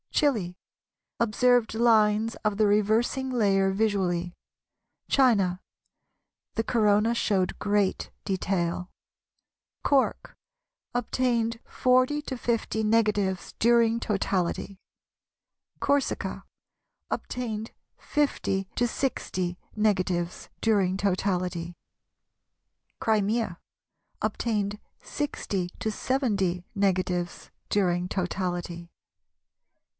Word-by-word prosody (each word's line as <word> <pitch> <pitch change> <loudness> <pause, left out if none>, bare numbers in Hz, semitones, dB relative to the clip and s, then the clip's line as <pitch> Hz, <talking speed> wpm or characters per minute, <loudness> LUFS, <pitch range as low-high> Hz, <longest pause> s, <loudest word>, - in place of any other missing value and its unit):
Chili, 215 -12 +1 0.6
Observed 235 +1 +3
lines 220 -1 +3
of 210 -1 +1
the 215 -1 +4
reversing 220 +6 +2
layer 195 -5 +3
visually. 190 -4 0 0.7
China, 200 -9 +3 0.9
The 225 - +1
Corona 220 0 +3
showed 190 -5 +1
great 205 -1 0
detail. 180 -2 -1 0.9
Cork, 275 -2 +1 0.6
Obtained 235 -1 0
40 255 +4 +2
50 240 -5 -2
negatives 210 -4 +1
during 235 0 +4
totality. 195 -2 -1 1.0
Corsica, 280 -1 0 0.7
Obtained 225 -3 -4 0.3
50 195 -10 -1
60 205 -7 -1 0.2
negatives 185 -5 0
during 195 -4 +2
totality. 180 -3 -1 1.2
Crimea, 215 -3 +1 0.6
Obtained 210 -3 -1 0.2
60 200 -11 -3
70 210 -6 0
negatives 185 -3 0 0.2
during 180 -3 +1
totality. 175 -2 -3
210 Hz, 70 wpm, -27 LUFS, 185-230 Hz, 1.2 s, the